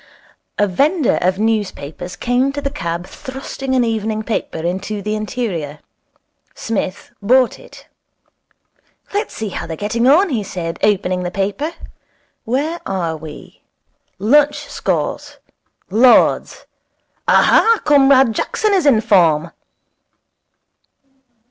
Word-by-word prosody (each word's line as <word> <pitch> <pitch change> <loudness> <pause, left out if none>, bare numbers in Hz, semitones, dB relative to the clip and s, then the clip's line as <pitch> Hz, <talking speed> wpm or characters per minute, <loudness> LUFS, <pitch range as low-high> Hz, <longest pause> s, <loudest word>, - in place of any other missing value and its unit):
A 205 - +3
vendor 280 - +1
of 185 +1 +1
newspapers 200 -6 -3
came 250 +3 0
to 285 - -3
the 275 -1 -3
cab 170 -8 -4
thrusting 265 +1 -5
an 250 - +3
evening 220 -1 -2
paper 220 -6 -3
into 190 +6 -3
the 210 +1 -3
interior. 205 - -4 0.8
Psmith 200 -3 -4
bought 250 +4 +3
it. - - -15 1.3
'Let's 415 +2 -2
see 220 -2 -4
how 180 - -6
they're 160 -1 -6
getting 230 +4 0
on,' 345 +8 +5
he 240 -7 -1
said, 170 -3 -5
opening 185 -3 +1
the 175 - -3
paper. 200 - -2 0.7
'Where 290 +8 -2
are 175 -4 -2
we? 155 -1 -11 0.6
Lunch 295 +8 +2
scores. - - -3 0.5
Lord's. 240 +4 +3 0.6
Aha! 455 -1 +4
Comrade 270 -4 +5
Jackson 425 - 0
is 365 -6 +2
in 230 -6 +5
form.' 170 -7 +3
220 Hz, 115 wpm, -18 LUFS, 185-270 Hz, 1.3 s, on